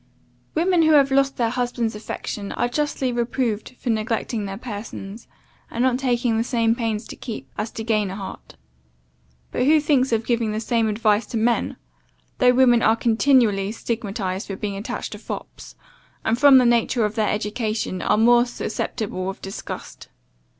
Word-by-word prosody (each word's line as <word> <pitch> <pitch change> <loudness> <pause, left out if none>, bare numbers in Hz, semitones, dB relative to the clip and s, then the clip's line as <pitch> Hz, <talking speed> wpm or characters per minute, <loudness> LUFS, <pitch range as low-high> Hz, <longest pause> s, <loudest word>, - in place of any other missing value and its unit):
"Women 345 +2 +3
who 315 -1 +5
have 275 -2 +5
lost 275 0 +2
their 230 -2 +1
husband's 245 -2 -1
affection, 210 -1 -5
are - - 0
justly 265 0 -1
reproved 240 -1 -2
for 245 - -2
neglecting 220 0 -1
their 195 0 -5
persons, 210 -2 -8 0.4
and 235 - -1
not 255 -1 +2
taking 245 -3 +1
the - - +2
same 230 -2 +1
pains 225 -2 -2
to - - -7
keep, 230 -4 -7
as 210 +2 -3
to 225 - -5
gain 215 -3 +1
a 190 - -5
heart; 195 -1 -9 1.0
but - - 0
who 310 +1 +6
thinks 280 -4 +2
of 225 -1 +1
giving 230 -3 0
the 215 - -1
same 230 0 +1
advice 210 0 +1
to 230 - -3
men, 230 +2 +1 0.6
though 250 -1 +6
women 245 -2 +5
are 220 - +4
continually 225 -4 +3
stigmatized 205 -4 -3
for 195 - -4
being 200 0 -4
attached 200 +2 -5
to - - -7
fops; - - -8 0.5
and 225 +2 +1
from 280 -1 +8
the 255 - +5
nature 235 -1 +2
of 210 - -2
their 215 -1 0
education, 215 -2 -2
are - - +2
more 240 +2 +5
susceptible 215 -5 -3
of 195 - -7
disgust? 195 +1 -8
230 Hz, 170 wpm, -23 LUFS, 215-250 Hz, 1.0 s, from